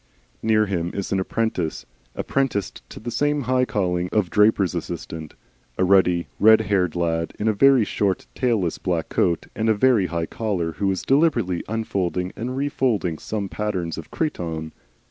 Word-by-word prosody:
Near 110 -1 +3
him 85 -4 -2
is 100 - -4
an 95 - +1
apprentice, 95 -4 -2 0.3
apprenticed 135 -8 -1
to - - -9
the 120 +2 -5
same 145 +3 +1
high 125 +1 +2
calling 90 -5 -1
of 105 -5 +1
draper's 105 -4 +3
assistant, 80 -2 -6 0.4
a - - +2
ruddy, 90 -2 +4
red 110 +1 +7
haired 95 -4 0
lad 85 -1 -1
in 105 - -1
a 110 - +3
very 130 +1 +5
short 100 -2 -1
tailless 110 -9 0
black 85 -3 -2
coat 85 -1 +1
and 110 +1 0
a 110 - +4
very 110 -4 +3
high 85 0 -2
collar, 95 -5 -2
who 95 +5 -1
is 95 -1 -2
deliberately 130 - +2
unfolding 95 -5 -2
and 125 +3 -4
refolding 125 - 0
some 105 -2 -3
patterns 90 -1 -3
of 80 - -9
cretonne. 80 - -3
100 Hz, 165 wpm, -23 LUFS, 85-110 Hz, 0.4 s, red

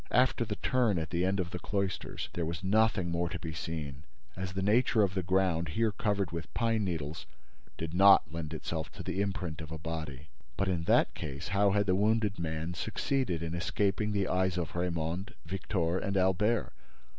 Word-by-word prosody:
After 125 -1 +3
the 105 -2 -3
turn 120 -6 +2
at 80 0 -3
the 85 0 +1
end 95 +2 +1
of 90 -1 -2
the 90 - -4
cloisters, 100 -1 -3
there 85 - -2
was 85 +2 -3
nothing 95 -3 +2
more 85 0 0
to - - -4
be 80 -2 -6
seen, 75 -4 -5 0.3
as 95 0 -4
the 95 0 -1
nature 110 +1 +4
of 95 -2 +1
the 95 - 0
ground, 90 -2 +1
here 115 -1 +3
covered 100 -2 0
with 85 -1 -5
pine 115 -2 +2
needles, 80 -5 -3 0.5
did 80 0 -4
not 95 -4 +6
lend 80 -2 -4
itself 80 0 -4
to - - -7
the 95 - -1
imprint 90 -5 -3
of 80 0 -8
a 80 - -4
body. 80 -4 -5 0.3
But, 100 +1 +1
in 85 -2 -1
that - - +4
case, 70 +5 -5
how 100 +1 +3
had 100 +1 +2
the 95 - +2
wounded 105 0 +2
man 80 +1 -2
succeeded 95 - -1
in 80 0 -3
escaping 100 +4 0
the 100 -2 +1
eyes 95 0 +1
of 85 -4 -2
Raymonde, 85 +2 -2
Victor 90 0 -1
and 100 -1 -1
Albert? 95 - +2
90 Hz, 195 wpm, -31 LUFS, 80-100 Hz, 0.5 s, not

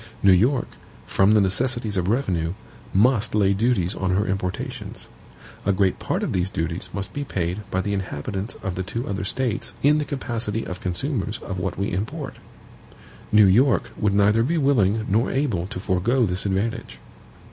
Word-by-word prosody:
New 100 - +7
York, 120 +8 +3 0.4
from 95 +2 +3
the 105 - +5
necessities 115 +2 +1
of 90 -2 0
revenue, 90 -8 0 0.4
must 110 +2 +3
lay 100 -2 +4
duties 100 -4 +1
on 95 0 -2
her 100 +2 +1
importations. 95 -2 -3 0.6
A 100 - +2
great 95 -1 +1
part - - -2
of - - -1
these 90 +1 0
duties 85 -1 -3
must 100 0 -5
be 145 - -3
paid 90 -5 -2
by 95 - 0
the 100 +2 -2
inhabitants 95 +2 -4
of 95 -3 -2
the 95 - -3
two 115 +6 -4
other 100 -1 -2
States 120 +2 -2
in 150 +2 +5
the - - 0
capacity 115 -5 -3
of 90 0 -6
consumers 105 - -2
of 95 -2 -4
what 90 -1 -3
we 100 +1 -1
import. 100 +5 -4 0.9
New 105 -1 +7
York 120 +8 +3
would 105 -2 +1
neither 105 +2 +4
be 160 +9 +1
willing 110 -7 +2
nor 110 +5 +2
able 120 -11 0
to 95 -2 -6
forego 110 +7 +1
this 95 +1 -1
advantage. 100 +4 -2
100 Hz, 175 wpm, -23 LUFS, 95-120 Hz, 0.9 s, New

